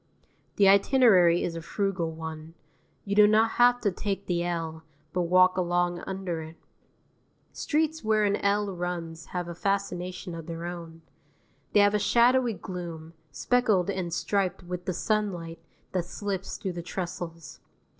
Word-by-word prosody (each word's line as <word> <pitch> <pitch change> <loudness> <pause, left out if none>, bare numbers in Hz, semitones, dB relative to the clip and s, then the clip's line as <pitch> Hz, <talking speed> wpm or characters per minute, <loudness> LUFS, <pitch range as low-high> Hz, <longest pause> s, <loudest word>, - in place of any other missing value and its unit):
The 200 - +5
itinerary 195 -4 +5
is 170 - -3
a 165 - -5
frugal 185 -2 -2
one: 160 0 -8 0.5
you 200 0 -2
do 210 0 +7
not 220 +2 +4
have 245 0 +6
to 205 - +1
take 195 +1 -3
the 175 -1 0
L, 165 -2 -3 0.3
but 180 - +1
walk 185 +1 +5
along 175 -1 0
under 190 -4 -3
it. 160 +1 -9 1.0
Streets 315 0 -1
where 215 -1 +2
an 205 0 +2
L 200 0 +1
runs 170 -2 -5
have 180 -1 -4
a 170 - -5
fascination 185 -1 -3
of 165 -1 -8
their 165 0 -5
own. 165 -2 -8 0.7
They 205 - +6
have 205 0 +4
a 210 - +2
shadowy 240 +3 +3
gloom, 170 -3 -7 0.2
speckled 200 - +1
and 185 -3 -3
striped 190 +1 -1
with 180 0 -6
the 185 - -1
sunlight 175 -5 -2 0.3
that 180 -2 -1
slips 195 0 -4
through 190 -4 -4
the 175 - -5
trestles. 170 -2 -6
180 Hz, 155 wpm, -27 LUFS, 170-205 Hz, 1.0 s, do